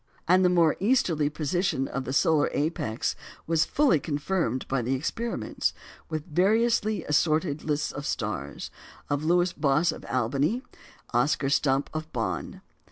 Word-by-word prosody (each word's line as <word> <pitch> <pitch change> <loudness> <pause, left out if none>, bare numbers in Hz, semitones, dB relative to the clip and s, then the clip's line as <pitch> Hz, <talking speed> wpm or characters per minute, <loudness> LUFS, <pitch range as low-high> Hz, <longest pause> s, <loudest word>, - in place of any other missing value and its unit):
And 185 +2 +5
the 180 - +5
more 170 -3 +3
easterly 180 - +2
position 155 -1 -1
of 135 -1 -4
the - - -3
solar 150 +2 +3
apex 145 -7 -1 0.3
was 165 0 +2
fully 275 - +3
confirmed 145 -3 -2
by 135 -1 0
the 125 +3 0
experiments, 225 - -2 0.3
with 155 -1 -3
variously 215 +3 +2
assorted 155 0 +1
lists 150 -1 -1
of 145 0 -6
stars, 105 - -4 0.4
of 145 +1 0
Lewis 175 +2 +2
Boss 155 +4 +2
of - - -9
Albany, 135 - 0
and 250 +2 -5 0.5
Oscar 135 +3 +2
Stumpe 135 -1 +1
of 155 0 -5
Bonn. 95 -9 -3
155 Hz, 145 wpm, -27 LUFS, 135-175 Hz, 0.5 s, And